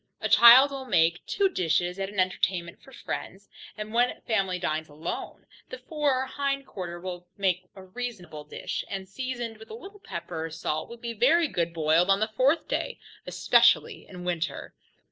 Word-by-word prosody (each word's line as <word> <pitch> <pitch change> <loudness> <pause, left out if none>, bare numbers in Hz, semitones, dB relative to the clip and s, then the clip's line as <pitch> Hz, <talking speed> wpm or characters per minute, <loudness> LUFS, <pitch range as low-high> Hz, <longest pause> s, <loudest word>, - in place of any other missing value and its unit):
A - - -2
child 250 +4 +9
will 270 -1 -6
make 170 -4 +2
two 400 -1 +2
dishes 180 - 0
at 195 0 -2
an 205 -1 -5
entertainment 185 -1 -1
for 270 - -17
friends, 200 -5 -7 0.3
and 215 +1 -6
when 245 +1 +4
the - - -24
family 195 -5 0
dines 155 -2 -2
alone, 155 +3 -6 0.2
the - - -6
fore 295 - 0
or - - -4
hind 275 0 -2
quarter 175 -6 -7
will 180 0 -7
make 185 -2 0
a 190 - -11
reasonable 185 -7 -7
dish, 150 - -5
and 190 -1 -5
seasoned 240 +1 -5
with 220 - -14
a - - -7
little 410 -2 -12
pepper 170 - -6
or - - -5
salt, 155 -1 -3
will 235 - -9
be 235 0 -5
very 305 +10 +4
good 170 - -1
boiled 165 +2 +2
on 195 0 +4
the 215 - +1
fourth 275 +7 +2
day, - - -2 0.3
especially - - +3
in 180 -2 -10
winter. 175 -1 -3
195 Hz, 185 wpm, -27 LUFS, 175-255 Hz, 0.3 s, child